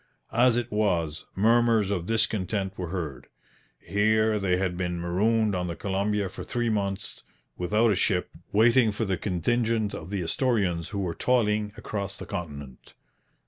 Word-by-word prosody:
As 120 Hz, +1 st, +4 dB
it 120 Hz, -, -2 dB
was, 85 Hz, -8 st, 0 dB
murmurs 115 Hz, 0 st, +3 dB
of 90 Hz, -3 st, -2 dB
discontent 105 Hz, -3 st, 0 dB
were 90 Hz, -, -4 dB
heard. 80 Hz, -7 st, -5 dB, 0.5 s
Here 110 Hz, +1 st, +2 dB
they 95 Hz, -2 st, +1 dB
had 95 Hz, -1 st, -1 dB
been 90 Hz, -1 st, -2 dB
marooned 105 Hz, +5 st, +1 dB
on 90 Hz, -1 st, -1 dB
the 85 Hz, -, -4 dB
Columbia 100 Hz, +2 st, -1 dB
for 90 Hz, -, -8 dB
three 120 Hz, -1 st, -1 dB
months 100 Hz, -2 st, -3 dB, 0.3 s
without 105 Hz, +5 st, +2 dB
a -, -, +2 dB
ship, 90 Hz, -1 st, 0 dB, 0.2 s
waiting 115 Hz, +2 st, +5 dB
for 105 Hz, +2 st, -2 dB
the 95 Hz, -2 st, 0 dB
contingent 110 Hz, +4 st, 0 dB
of -, -, -7 dB
the 100 Hz, -3 st, -2 dB
Astorians 90 Hz, -4 st, 0 dB
who 100 Hz, -, -5 dB
were 90 Hz, -4 st, -1 dB
toiling 105 Hz, -3 st, +1 dB
across 100 Hz, -2 st, -4 dB
the -, -, -7 dB
continent. 70 Hz, -6 st, -7 dB
100 Hz, 155 wpm, -27 LUFS, 90-110 Hz, 0.5 s, waiting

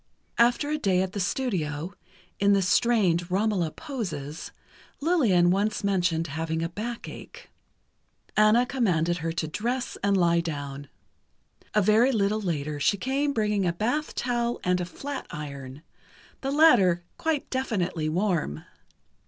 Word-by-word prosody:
After 245 Hz, +5 st, +3 dB
a 305 Hz, -, 0 dB
day 185 Hz, -6 st, +2 dB
at 190 Hz, -, -4 dB
the 205 Hz, -, -3 dB
studio, 180 Hz, -, -2 dB, 0.5 s
in 200 Hz, 0 st, +4 dB
the 195 Hz, -1 st, +3 dB
strained 185 Hz, -4 st, +2 dB
"Romola" 190 Hz, -3 st, +1 dB
poses, 165 Hz, -, -6 dB, 0.5 s
Lillian 235 Hz, -, +3 dB
once 210 Hz, +3 st, 0 dB
mentioned 175 Hz, -4 st, +1 dB
having 160 Hz, +2 st, -3 dB
a 165 Hz, -, -2 dB
back 230 Hz, +6 st, -5 dB
ache. -, -, -11 dB, 0.8 s
Anna 215 Hz, +3 st, +5 dB
commanded 175 Hz, -10 st, +1 dB
her 165 Hz, 0 st, -2 dB
to 170 Hz, -, -2 dB
undress 240 Hz, +10 st, -3 dB
and 200 Hz, -1 st, +3 dB
lie 170 Hz, -2 st, +3 dB
down. 145 Hz, -4 st, -5 dB, 0.9 s
A 210 Hz, -, +4 dB
very 220 Hz, +6 st, +4 dB
little 215 Hz, -2 st, +1 dB
later 150 Hz, -5 st, -2 dB
she 200 Hz, +8 st, +2 dB
came 275 Hz, +7 st, 0 dB
bringing 210 Hz, -6 st, 0 dB
a 170 Hz, -, +1 dB
bath 245 Hz, -, -2 dB
towel, 240 Hz, -1 st, -1 dB
and 180 Hz, 0 st, +1 dB
a -, -, -2 dB
flat 275 Hz, +9 st, -6 dB
iron, 140 Hz, -1 st, -8 dB, 0.6 s
the 270 Hz, -, -2 dB
latter 200 Hz, -, +5 dB, 0.2 s
quite 320 Hz, -3 st, -1 dB
definitely 185 Hz, -11 st, -1 dB
warm. 165 Hz, -, -1 dB
195 Hz, 140 wpm, -26 LUFS, 165-235 Hz, 0.9 s, Anna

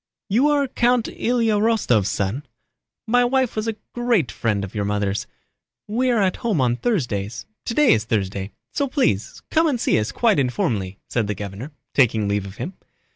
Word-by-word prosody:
"You 240 Hz, +9 st, +4 dB
are 290 Hz, -2 st, +2 dB
Count 245 Hz, -2 st, +2 dB
Ilyá 230 Hz, -3 st, +1 dB
Rostóv's 190 Hz, -, +2 dB
son? 100 Hz, +8 st, -2 dB, 0.6 s
My 245 Hz, +2 st, +3 dB
wife 255 Hz, 0 st, +1 dB
was 215 Hz, +1 st, -2 dB
a 225 Hz, -, -1 dB, 0.2 s
great 240 Hz, -, +1 dB
friend 105 Hz, -4 st, -1 dB
of 95 Hz, -, -6 dB
your 105 Hz, -, -1 dB
mother's. 100 Hz, -1 st, -1 dB, 0.6 s
We 245 Hz, +5 st, +1 dB
are 230 Hz, -4 st, +3 dB
at 185 Hz, -1 st, +1 dB
home 225 Hz, -, 0 dB
on 120 Hz, -2 st, +2 dB
Thursdays—today 170 Hz, -, 0 dB
is 110 Hz, -, 0 dB
Thursday, 100 Hz, -3 st, -1 dB, 0.2 s
so 280 Hz, -, 0 dB
please 255 Hz, -, 0 dB
come 320 Hz, +1 st, +4 dB
and 270 Hz, -6 st, 0 dB
see 115 Hz, -, +2 dB
us 105 Hz, -, -2 dB
quite 225 Hz, -8 st, +2 dB
informally," 110 Hz, -7 st, -1 dB
said 115 Hz, -4 st, -1 dB
the 105 Hz, -, -2 dB
governor, 100 Hz, +7 st, -6 dB, 0.2 s
taking 110 Hz, -6 st, +3 dB
leave 100 Hz, -1 st, -1 dB
of 95 Hz, -, -10 dB
him. 180 Hz, -, -5 dB
145 Hz, 175 wpm, -22 LUFS, -, 0.6 s, You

